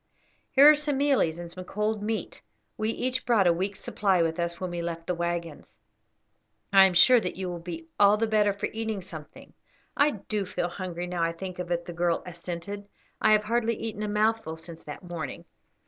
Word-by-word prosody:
"Here 275 +2 +7
are 305 - +10
some 295 -2 -1
mealies 270 - +2
and 170 -1 -7
some 185 +1 -8
cold 210 +3 -2
meat. 220 +1 -3 0.3
We 215 - -1
each 255 +2 -1
brought 225 -5 +3
a 175 - +5
week's 190 +3 -3
supply 190 -4 +1
with 165 +1 -1
us 170 0 -2
when 185 -1 -4
we 175 0 -3
left 165 -1 -4
the 180 - -1
waggons. 170 -2 -4 1.0
I 195 -1 +9
am 185 -2 +1
sure 250 +7 +7
that 180 - -3
you 185 0 -4
will 175 - -5
be 165 -1 -7
all 205 +1 +6
the 225 - +1
better 215 -2 +3
for 200 - -3
eating 220 -3 -3
something." 160 -4 -11 0.4
"I 285 +1 +4
do 205 -4 -3
feel 175 - -2
very - - -12
hungry, 180 -2 -4
now 180 -1 -3
I 165 0 +1
think 185 +1 -7
of 180 -1 -4
it," 170 0 -1
the 175 - -7
girl 170 0 0
assented; 180 +3 -6 0.3
"I 215 - +5
have 210 0 +4
hardly 230 +1 0
eaten 215 -2 -5
a 210 - -1
mouthful 210 -5 0
since 165 0 -10
that 150 +5 -8
morning." 170 -3 -6
185 Hz, 210 wpm, -27 LUFS, 170-215 Hz, 1.0 s, are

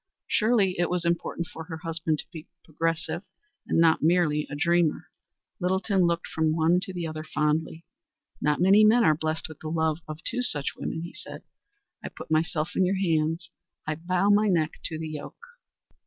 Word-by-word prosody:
Surely 210 -5 +2
it 175 - +1
was 180 -1 -1
important 170 0 -1
for 160 0 -9
her 160 -1 -6
husband 160 -1 -2
to - - -6
be 160 -2 -9 0.2
progressive 165 +2 -2 0.5
and - - +1
not 165 -1 +4
merely 155 -2 +2
a 145 - -5
dreamer. 170 +1 +1 0.5
Littleton 190 0 +1
looked 170 0 -1
from 160 -1 0
one 165 +2 +3
to 190 +1 -5
the 175 -2 -4
other 155 -1 -5
fondly. 155 +2 -1 0.6
"Not 150 -1 +1
many 195 +4 +6
men 230 +3 +6
are 155 - +5
blessed 155 +1 -3
with 155 -2 -12
the 155 - -6
love 160 -1 0
of 155 0 -6
two 250 - -1
such 145 - 0
women," 160 - -4
he 170 - -8
said. - - -10 0.6
"I - - -5
put - - -11
myself 155 0 +1
in - - +3
your 190 +1 +1
hands. 165 -2 0 0.3
I 155 - -1
bow 180 +5 +1
my 210 +1 +4
neck 165 -5 +2
to 160 - -2
the 160 0 -5
yoke." 155 - -8
165 Hz, 185 wpm, -26 LUFS, 155-180 Hz, 0.6 s, many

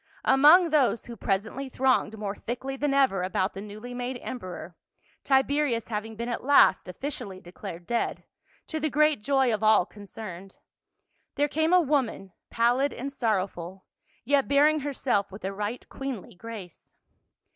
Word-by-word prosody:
Among 305 +6 +6
those 275 -6 +2
who 235 - -8
presently 225 +7 -2
thronged 255 -4 +1
more 205 -2 -3
thickly 260 +3 -5
than 285 +1 -1
ever 270 -9 +3
about 185 +1 -1
the 195 - -7
newly 215 +4 -8
made 250 +1 -4
emperor 185 -7 -7 0.2
— - - -37
Tiberius 270 -3 +1
having 220 0 -4
been 235 +2 -4
at 240 - -3
last 280 -7 +5
officially 195 -2 -6
declared 175 -1 -9
dead, 235 +4 -1 0.4
to 315 - -4
the 310 0 0
great 300 -3 +3
joy 265 -1 +2
of 215 - -2
all 215 -4 +5
concerned 195 -2 -10 0.4
— - - -48
there 290 - +2
came 315 +3 0
a 365 - +7
woman, 265 - 0 0.2
pal 235 +2 +2
lid 280 +1 +1
and 275 +3 -5
sorrowful, 190 -6 -2 0.4
yet 275 +1 +2
bearing 295 +2 +4
herself 265 -8 -1
with 195 0 -9
a 195 - -2
right 210 +4 -4
queenly 270 -8 -6
grace. 205 -3 -10
240 Hz, 160 wpm, -27 LUFS, 200-275 Hz, 0.4 s, a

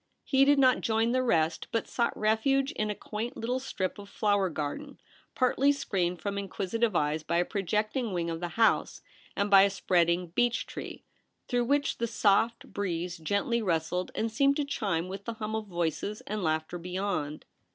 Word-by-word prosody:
He 270 -1 +4
did 285 +1 +5
not 260 -2 +4
join 225 +1 +1
the 255 +1 +2
rest, 165 -9 +1
but 230 - -1
sought 235 -1 -1
refuge 265 +6 +2
in 215 - -2
a 210 - -2
quaint 225 +6 -5
little 250 +3 -1
strip 200 -7 -3
of 200 0 -10
flower 205 -2 +1
garden 160 - -5 0.4
partly 265 +2 +3
screened 180 -10 -1
from 200 -1 -2
inquisitive 200 +2 -1
eyes 150 0 +1
by 170 +2 -1
a 175 - +2
projecting 215 +5 -1
wing 175 -2 -1
of 165 -1 -3
the 175 - -3
house 225 -1 +2 0.3
and 200 0 0
by 195 -1 +9
a 200 - +5
spreading 175 -2 +1
beech 235 +6 +1
tree, - - -8 0.4
through 245 -1 +1
which 285 +3 +1
the 235 - 0
soft 225 +1 +1
breeze 180 -3 -3
gently 200 +8 0
rustled 180 -1 -1
and 225 0 -1
seemed 275 +5 +3
to 295 - 0
chime 195 -10 -1
with 195 +1 -7
the 230 - -3
hum 220 0 -4
of 220 -1 -4
voices 175 +3 -2
and 210 0 -4
laughter 160 +1 -1
beyond. 180 -4 -3
205 Hz, 185 wpm, -29 LUFS, 175-235 Hz, 0.4 s, by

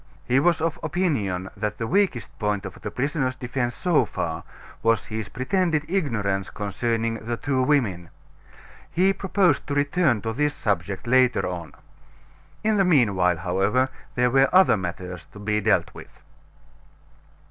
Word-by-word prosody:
He 125 +2 +3
was 170 +2 +2
of 165 -1 -1
opinion 140 - -1
that 105 0 -3
the 115 - -3
weakest 180 - 0
point 105 -2 -1
of 95 - -9
the - - -4
prisoner's 130 +2 -1
defense 125 -1 -3
so 175 -4 +2
far 80 -1 -4 0.4
was 115 0 +2
his 110 -1 -5
pretended 155 +3 0
ignorance 110 - -1
concerning 115 +2 -2
the 120 +1 -3
two 130 0 0
women. 115 - +1 0.8
He 190 +3 +3
proposed 195 -1 +1
to 145 - -2
return 145 -3 +2
to 110 0 -2
this 150 +4 0
subject 100 -1 -2
later 125 0 +3
on. 85 -4 -6 0.9
In 215 0 +2
the 195 - +4
mean 140 - +4
while, 90 -2 +2
however, 95 +9 +1 0.3
there 125 0 +2
were 135 +1 +4
other 185 -7 +6
matters 90 -2 -6
to 105 - -11
be 105 +1 0
dealt 110 0 +1
with. - - -13
120 Hz, 150 wpm, -24 LUFS, 100-150 Hz, 0.9 s, other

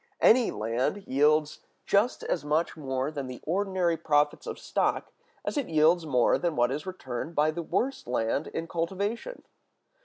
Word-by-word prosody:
Any 240 0 +5
land 120 - -2
yields 150 +3 +2 0.3
just 210 +5 +2
as 170 - -1
much 155 +3 0
more 135 -1 -2
than 140 -4 -5
the 130 -1 -7
ordinary 185 -1 0
profits 150 -2 +1
of - - -4
stock - - -1 0.3
as - - -2
it 275 -8 -1
yields 160 +1 +3
more 125 -4 +3
than 170 -3 -1
what 120 -1 +2
is 150 +6 -4
returned 160 -3 -5
by 150 +1 +3
the 170 +2 -4
worst 255 - -2
land 120 +4 0
in 165 - -4
cultivation. 200 - -3
155 Hz, 160 wpm, -28 LUFS, 140-185 Hz, 0.3 s, Any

